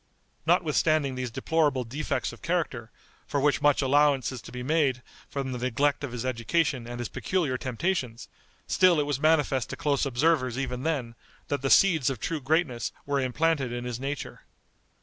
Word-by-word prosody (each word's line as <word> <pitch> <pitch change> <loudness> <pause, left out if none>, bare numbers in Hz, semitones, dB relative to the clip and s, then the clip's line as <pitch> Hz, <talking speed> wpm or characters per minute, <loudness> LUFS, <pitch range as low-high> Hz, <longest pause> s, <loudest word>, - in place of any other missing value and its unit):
Notwithstanding 155 -4 +2
these 130 -1 -3
deplorable 145 +1 +1
defects 135 +7 -3
of - - -14
character, 155 -10 -2 0.4
for 145 - -1
which 145 +1 +2
much 145 -1 +3
allowance 140 -3 +3
is 130 -3 -7
to - - -12
be 125 0 -6
made 135 -3 +1 0.3
from 135 -2 -3
the 125 - -4
neglect 140 +4 0
of 140 - -4
his 125 0 -4
education 130 +1 0
and 120 0 -6
his 120 -1 -3
peculiar 170 -9 -1
temptations, 130 -2 -2 0.4
still 180 -4 +4
it 145 - +1
was 145 -2 -1
manifest 150 -5 +2
to - - -6
close 145 -2 0
observers 130 -2 +1
even 125 -2 -3
then, 135 -6 -2 0.4
that 145 - -1
the 135 - -1
seeds 160 -8 +5
of 130 -5 -4
true 160 +4 -3
greatness 140 -3 0
were 140 0 0
implanted 135 +1 0
in 120 0 -4
his 125 -1 -4
nature. 140 +2 -5
135 Hz, 175 wpm, -27 LUFS, 125-155 Hz, 0.4 s, seeds